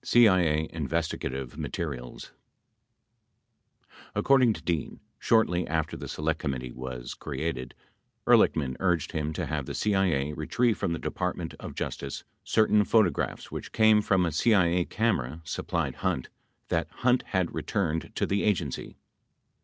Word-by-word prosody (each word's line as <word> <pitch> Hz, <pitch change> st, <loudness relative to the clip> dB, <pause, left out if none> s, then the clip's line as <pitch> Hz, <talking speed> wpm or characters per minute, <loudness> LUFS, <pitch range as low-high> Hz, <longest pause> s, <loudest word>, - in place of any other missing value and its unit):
CIA 90 Hz, -10 st, +4 dB
INVESTIGATIVE 70 Hz, -5 st, -3 dB
MATERIALS 65 Hz, -7 st, -5 dB, 1.8 s
According 130 Hz, -4 st, +4 dB
to -, -, -9 dB
Dean, 85 Hz, -4 st, -2 dB, 0.2 s
shortly 90 Hz, -6 st, +2 dB
after 80 Hz, -1 st, -1 dB
the -, -, -7 dB
Select 80 Hz, 0 st, -1 dB
Committee 65 Hz, -2 st, -3 dB
was 60 Hz, -1 st, -6 dB
created, 70 Hz, -3 st, -4 dB, 0.5 s
Ehrlichman 65 Hz, -4 st, +4 dB
urged 90 Hz, -4 st, +1 dB
him 80 Hz, -2 st, -2 dB
to -, -, -2 dB
have 75 Hz, -4 st, -3 dB
the -, -, -4 dB
CIA 90 Hz, -9 st, +1 dB
retrieve 105 Hz, +9 st, 0 dB
from 95 Hz, -4 st, 0 dB
the -, -, -2 dB
Department 90 Hz, -1 st, -3 dB
of -, -, -8 dB
Justice 70 Hz, -1 st, -4 dB, 0.2 s
certain 105 Hz, -1 st, +4 dB
photographs 100 Hz, -7 st, +1 dB
which -, -, -6 dB
came 110 Hz, -1 st, +5 dB
from 95 Hz, -3 st, +2 dB
a 85 Hz, -, 0 dB
CIA 90 Hz, -2 st, +3 dB
camera 85 Hz, -, -1 dB
sup 80 Hz, -, -5 dB
plied -, -, 0 dB
Hunt 65 Hz, -, -1 dB, 0.4 s
that -, -, 0 dB
Hunt 125 Hz, 0 st, +2 dB
had 95 Hz, -3 st, 0 dB
returned 80 Hz, -5 st, -1 dB
to -, -, +1 dB
the 100 Hz, +1 st, 0 dB
Agency. 85 Hz, -10 st, -1 dB
85 Hz, 135 wpm, -28 LUFS, 70-100 Hz, 1.8 s, came